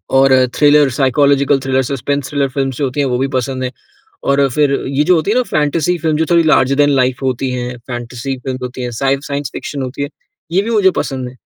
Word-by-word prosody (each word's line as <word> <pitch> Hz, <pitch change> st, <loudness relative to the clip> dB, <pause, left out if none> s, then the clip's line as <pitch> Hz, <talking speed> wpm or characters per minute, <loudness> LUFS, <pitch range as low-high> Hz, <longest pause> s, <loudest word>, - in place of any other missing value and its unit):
और 135 Hz, 0 st, +5 dB, 0.2 s
thriller, 145 Hz, -1 st, +5 dB
psychological 140 Hz, +2 st, +2 dB
thriller, 130 Hz, 0 st, 0 dB
suspense 140 Hz, +1 st, -2 dB
thriller 140 Hz, -2 st, 0 dB
films 135 Hz, -1 st, -2 dB
जो 145 Hz, -, 0 dB
होती 130 Hz, +3 st, -4 dB
हैं, 140 Hz, -, +2 dB
वो 125 Hz, -1 st, 0 dB
भी 135 Hz, +2 st, 0 dB
पसंद 130 Hz, +1 st, -3 dB
हैं। 125 Hz, -, -2 dB, 0.6 s
और 140 Hz, 0 st, +3 dB
फिर 150 Hz, -2 st, +2 dB, 0.2 s
ये 140 Hz, +2 st, 0 dB
जो 180 Hz, -, +4 dB
होती 165 Hz, +4 st, 0 dB
है 225 Hz, -, +1 dB
ना 250 Hz, -, +4 dB
फ़ैंटेसी 155 Hz, -, 0 dB
फ़िल्म, 155 Hz, -1 st, 0 dB
जो 160 Hz, -, +1 dB
थोड़ी 170 Hz, -1 st, +5 dB
लार्जर 140 Hz, -4 st, +3 dB
देन 145 Hz, 0 st, +4 dB
लाइफ़ 130 Hz, -2 st, +1 dB
होती 130 Hz, 0 st, -1 dB
है, 125 Hz, 0 st, -4 dB
फ़ैंटेसी 120 Hz, +2 st, -5 dB
फ़िल्म्स 130 Hz, 0 st, -5 dB
होती 125 Hz, 0 st, -5 dB
हैं, 125 Hz, -, -3 dB
स 115 Hz, -, -7 dB, 0.3 s
साइंस 140 Hz, -2 st, -3 dB
फ़िक्शन 140 Hz, -2 st, -5 dB
होती 130 Hz, +2 st, -5 dB
है, 140 Hz, -, -2 dB, 0.4 s
ये 190 Hz, +3 st, +3 dB
भी 225 Hz, -, -4 dB
मुझे 205 Hz, -4 st, +4 dB
पसंद 130 Hz, -2 st, -3 dB
हैं। 130 Hz, -, -13 dB
135 Hz, 230 wpm, -16 LUFS, 130-145 Hz, 0.6 s, और